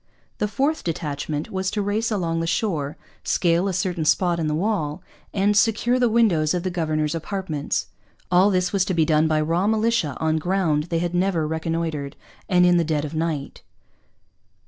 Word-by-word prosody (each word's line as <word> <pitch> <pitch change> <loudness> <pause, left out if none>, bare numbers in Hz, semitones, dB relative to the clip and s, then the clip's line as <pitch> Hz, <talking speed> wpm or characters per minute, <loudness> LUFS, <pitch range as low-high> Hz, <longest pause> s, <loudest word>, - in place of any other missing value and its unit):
The 210 - +1
fourth 280 +8 -1
detachment 150 -2 -3
was 190 0 -1
to 210 - -2
race 210 +3 0
along 170 -6 -1
the 165 - -2
shore, 160 -8 -1 0.3
scale 175 +2 +2
a - - 0
certain 180 -2 -1
spot 170 +2 +2
in 160 - -1
the 150 - 0
wall, 160 -5 -1 0.3
'and 205 +1 +1
secure 230 +4 +2
the 245 -2 +3
windows 185 -9 +3
of 175 - -2
the 185 - -2
Governor's 155 -3 -1
Apartments.' 165 -3 -3 0.5
All 185 +3 +5
this 180 -1 0
was 195 -2 +3
to 185 - -1
be 160 -2 +3
done 155 0 +3
by 155 -1 +2
raw 165 +5 +1
militia, 220 - +1
on 160 0 +1
ground 165 -4 0
they 170 -1 -2
had 175 +1 -2
never 175 -3 +1
reconnoitred, 160 -3 -3 0.3
and 180 -1 +5
in 175 0 +5
the 170 - +3
dead 155 -2 -1
of 150 - -7
night. 160 -3 -3
170 Hz, 185 wpm, -23 LUFS, 155-195 Hz, 0.5 s, All